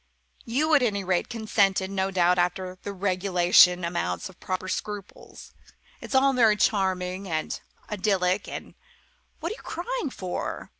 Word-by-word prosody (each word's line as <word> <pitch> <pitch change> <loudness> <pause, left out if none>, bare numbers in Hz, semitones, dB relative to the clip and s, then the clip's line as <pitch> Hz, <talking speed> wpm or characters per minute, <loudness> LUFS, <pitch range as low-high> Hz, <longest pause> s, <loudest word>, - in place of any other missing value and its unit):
You, 300 +7 +1
at 290 - +6
any 205 -5 0
rate, 180 -1 0
consented, 200 -4 +1
no 190 -1 0
doubt 180 -1 +3
after 185 +1 -1
the 200 - -5
regulation 180 -2 +4
amount 90 - -2
of 190 - -17
proper 185 0 -3
scruples. 205 +1 -6 0.5
It's - - -5
all 270 +1 +5
very 225 -4 +4
charming 190 -2 0
and 155 -1 -3 0.3
idyllic 195 -2 0
and - - -7 0.7
what 335 - -3
are - - -4
you - - -14
crying 360 - -3
for? 185 -7 -5
190 Hz, 145 wpm, -26 LUFS, 180-215 Hz, 0.7 s, at